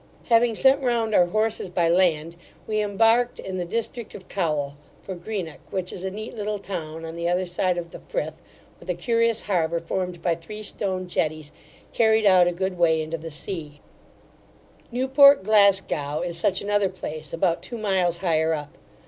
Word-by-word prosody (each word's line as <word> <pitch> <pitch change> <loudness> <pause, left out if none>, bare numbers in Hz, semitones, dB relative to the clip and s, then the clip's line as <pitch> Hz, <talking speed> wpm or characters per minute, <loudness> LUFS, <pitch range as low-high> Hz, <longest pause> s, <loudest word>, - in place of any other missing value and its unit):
Having 230 -1 +4
sent 270 +4 +4
round 235 -4 0
our 175 -3 +5
horses 215 0 -1
by 175 -1 +1
land, 170 -2 +2 0.3
we 215 -1 0
embarked 225 +4 +2
in 185 -1 -5
the 175 - -2
distinct 230 +4 -4
of 185 - -11
Cowal, 150 -7 -1 0.3
for 190 - -5
Greenock, 180 -3 -5
which 185 -1 -3
is 180 - -6
a 190 - -1
neat 215 +3 -7
little 210 -1 -3
town, 165 -5 -6
on 165 0 -7
the 170 0 -1
other 180 +1 +1
side 180 0 0
of 170 -1 -5
the - - -9
Frith, - - -2 0.5
with - - -14
a 180 - 0
curious 230 +4 +1
harbour 170 -4 0
formed 180 +1 -3
by 170 - +2
three 190 +6 -8
stone 190 -3 -3
jetties, 155 -3 -2 0.4
carried 220 -1 +3
out 185 -3 +6
a - - +2
good 185 +1 -3
way 160 -2 +4
into 160 +1 -3
the 165 +1 -7
sea 150 -2 -6 1.1
Newport 265 0 +6
Glasgow 195 -8 +3
is 175 -1 -3
such 185 +3 +1
another 205 -1 +1
place, 155 -5 -7
about 165 0 0
two 235 - -7
miles 190 -5 +1
higher 160 -2 +1
up. 145 -1 -8
185 Hz, 180 wpm, -24 LUFS, 165-215 Hz, 1.1 s, out